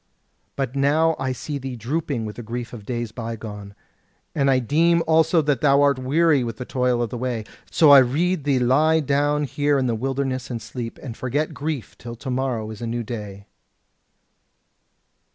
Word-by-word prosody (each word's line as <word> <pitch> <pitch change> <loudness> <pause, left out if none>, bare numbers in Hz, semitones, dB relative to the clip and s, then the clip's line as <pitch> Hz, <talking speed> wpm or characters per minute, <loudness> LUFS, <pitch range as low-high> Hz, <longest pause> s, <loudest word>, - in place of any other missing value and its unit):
But 135 -1 -3
now 155 +4 +3
I 130 - -1
see 140 +3 -5
thee 130 -1 -5
drooping 125 0 -2
with 105 - -7
the - - -5
grief 120 +2 -6
of 105 -4 -10
days 120 -3 -3
bygone; 110 -3 -7 0.6
and 140 -2 +2
I 135 - +4
deem 165 +7 +2
also 160 0 +3
that 145 -4 0
thou 140 -1 +4
art 140 -2 +3
weary 145 +1 +3
with 115 -2 -5
the 125 - -6
toil 125 -2 0
of 115 - -4
the 120 - -4
way. 125 -3 -2 0.3
So 155 -3 +5
I 140 - +10
rede 155 +6 +1
thee 140 -2 +2
lie 150 +6 +3
down 145 +1 +1
here 145 0 +1
in 130 - +1
the 120 - 0
wilderness 130 +2 -2
and 120 -2 -3
sleep, 115 +1 -7
and 120 -5 -6
forget 140 +6 -2
grief 145 -4 -4
till 120 0 -8
to 130 +3 -6
morrow 125 -4 -2
is 110 - -10
a 120 - -3
new 120 +1 -2
day." 105 -3 -7
130 Hz, 190 wpm, -23 LUFS, 120-145 Hz, 0.6 s, I